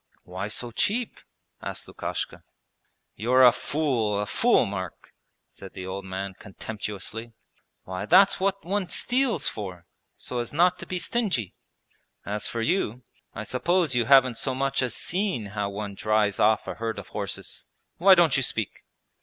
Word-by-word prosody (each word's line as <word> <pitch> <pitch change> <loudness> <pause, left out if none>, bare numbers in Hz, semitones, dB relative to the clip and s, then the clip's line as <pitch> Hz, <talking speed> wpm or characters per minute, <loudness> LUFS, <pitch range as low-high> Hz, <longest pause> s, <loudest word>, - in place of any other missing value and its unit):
'Why 95 +3 -5
so 120 +3 -3
cheap?' 225 - 0 0.4
asked - - -5
Lukashka. - - -5 0.7
'You're 125 +5 +5
a 125 - +9
fool, 120 -7 0
a 105 - -1
fool, 235 - +3
Mark,' 95 -4 -6 0.3
said 95 -1 -12
the 95 -1 -7
old 95 +1 -5
man 95 +1 -4
contemptuously. 105 +3 -6 0.5
'Why, 95 0 -5
that's 195 +4 +6
what 195 0 0
one 190 0 -1
steals 250 +3 +2
for, 95 -5 -5 0.3
so 125 - -4
as 120 - -3
not 175 +4 +3
to - - -8
be 185 - -2
stingy! 180 - -1 0.7
As 105 +2 -2
for 115 - -3
you, 125 - 0 0.3
I - - -4
suppose 170 +3 +1
you 120 -2 +2
haven't 130 -2 +6
so 130 -2 -1
much 135 +1 0
as 125 -3 -1
seen 185 - -1
how 100 -1 -1
one 100 0 -5
drives 105 0 +1
off 110 +1 +3
a - - -3
herd 115 -2 -4
of - - -8
horses? - - -4 0.3
Why 190 +2 +7
don't 170 -6 +4
you 135 - +2
speak?' 110 -5 -2
120 Hz, 160 wpm, -26 LUFS, 105-170 Hz, 0.7 s, a